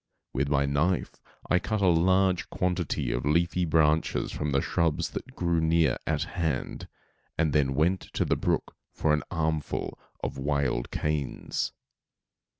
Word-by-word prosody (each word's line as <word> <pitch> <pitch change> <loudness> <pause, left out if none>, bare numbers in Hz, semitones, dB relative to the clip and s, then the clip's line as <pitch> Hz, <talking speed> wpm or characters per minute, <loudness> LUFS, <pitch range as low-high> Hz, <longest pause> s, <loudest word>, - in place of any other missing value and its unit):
With 70 +2 0
my 70 -1 +2
knife 75 +6 +1 0.4
I 90 - +3
cut 110 +4 -2
a 100 - +2
large 95 +2 +3
quantity 90 -3 -1
of - - -1
leafy 85 +4 +2
branches 80 -1 +2
from 75 -1 -2
the 70 - +3
shrubs 80 +2 0
that - - -7
grew 85 -2 +1
near 80 -4 +3
at - - +1
hand, 80 -7 -3 0.5
and 80 -3 +2
then 65 -3 +2
went 85 +5 +2
to - - +1
the - - +2
brook - - -1 0.2
for 75 - +1
an 75 - +2
armful 80 -2 -2 0.2
of 70 - -3
wild 70 -3 0
canes. 75 -3 -2
80 Hz, 150 wpm, -28 LUFS, 70-85 Hz, 0.5 s, I